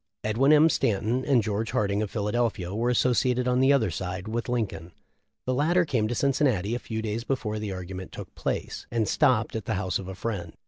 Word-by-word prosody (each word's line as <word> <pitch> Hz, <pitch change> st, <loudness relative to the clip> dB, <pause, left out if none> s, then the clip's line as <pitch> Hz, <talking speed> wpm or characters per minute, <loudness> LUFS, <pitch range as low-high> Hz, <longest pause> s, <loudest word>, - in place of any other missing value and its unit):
Edwin 115 Hz, +7 st, +3 dB
M. 155 Hz, +1 st, +7 dB
Stanton 115 Hz, -2 st, +1 dB
and 130 Hz, -6 st, +3 dB
George 110 Hz, +1 st, -2 dB
Harding, 100 Hz, 0 st, +1 dB
of 105 Hz, -, -2 dB
Philadelphia, 105 Hz, -3 st, -1 dB
were 115 Hz, +3 st, 0 dB
associated 125 Hz, +1 st, +2 dB
on 125 Hz, 0 st, +2 dB
the 135 Hz, +1 st, +5 dB
other 135 Hz, -6 st, +3 dB
side 95 Hz, +1 st, -4 dB
with 115 Hz, +2 st, -3 dB
Lincoln. 95 Hz, -9 st, -3 dB, 0.5 s
The 130 Hz, -, 0 dB
latter 170 Hz, +7 st, +3 dB
came 120 Hz, -8 st, 0 dB
to 120 Hz, -, -2 dB
Cin 140 Hz, +4 st, +2 dB
cinnati 115 Hz, -7 st, +1 dB
a 120 Hz, -, -1 dB
fe 110 Hz, -1 st, -3 dB
before 110 Hz, -5 st, -2 dB
the 105 Hz, -2 st, -4 dB
argument 95 Hz, 0 st, -6 dB
took -, -, -9 dB
place, -, -, -4 dB
and 115 Hz, -2 st, 0 dB
topped 115 Hz, +1 st, +2 dB
at 110 Hz, -3 st, -4 dB
the 110 Hz, -, -1 dB
house 95 Hz, -1 st, -1 dB
of 95 Hz, -, -7 dB
a 95 Hz, -, -6 dB
friend. 95 Hz, -6 st, -4 dB
110 Hz, 210 wpm, -27 LUFS, 100-125 Hz, 0.5 s, M